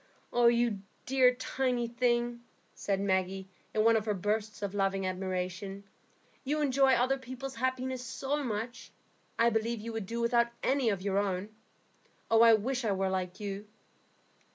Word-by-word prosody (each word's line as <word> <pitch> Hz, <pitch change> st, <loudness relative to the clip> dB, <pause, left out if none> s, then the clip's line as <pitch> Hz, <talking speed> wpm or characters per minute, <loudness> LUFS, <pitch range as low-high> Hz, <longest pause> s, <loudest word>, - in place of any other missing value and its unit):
"You 235 Hz, -3 st, +3 dB, 0.3 s
dear, 255 Hz, -1 st, +4 dB
tiny 250 Hz, -2 st, -1 dB
thing," 240 Hz, 0 st, 0 dB, 0.3 s
said 195 Hz, -1 st, -1 dB
Maggie, 190 Hz, -1 st, 0 dB, 0.2 s
in 215 Hz, -, +1 dB
one 230 Hz, 0 st, +5 dB
of 220 Hz, -1 st, +1 dB
her 210 Hz, -2 st, 0 dB
bursts 210 Hz, +2 st, -2 dB
of 200 Hz, -1 st, -2 dB
loving 195 Hz, -1 st, 0 dB
admiration, 185 Hz, +1 st, -3 dB, 0.6 s
"you 295 Hz, +3 st, -1 dB
enjoy 270 Hz, -2 st, +4 dB
other 260 Hz, +2 st, +2 dB
people's 260 Hz, +1 st, -7 dB
happiness 260 Hz, 0 st, -1 dB
so 280 Hz, +4 st, -2 dB
much, 235 Hz, 0 st, -4 dB, 0.5 s
I 235 Hz, +1 st, +4 dB
believe 225 Hz, +1 st, 0 dB
you 230 Hz, +2 st, -6 dB
would 220 Hz, -4 st, -4 dB
do 235 Hz, +3 st, -3 dB
without 235 Hz, 0 st, +3 dB, 0.2 s
any 265 Hz, -3 st, +2 dB
of 195 Hz, -3 st, -2 dB
your 200 Hz, 0 st, +1 dB
own. 195 Hz, 0 st, -1 dB, 0.8 s
I 225 Hz, 0 st, +7 dB
wish 250 Hz, +4 st, -2 dB
I 210 Hz, -3 st, +1 dB
were 190 Hz, 0 st, 0 dB
like 185 Hz, -1 st, -3 dB
you." 205 Hz, 0 st, -5 dB
230 Hz, 155 wpm, -31 LUFS, 195-250 Hz, 0.8 s, I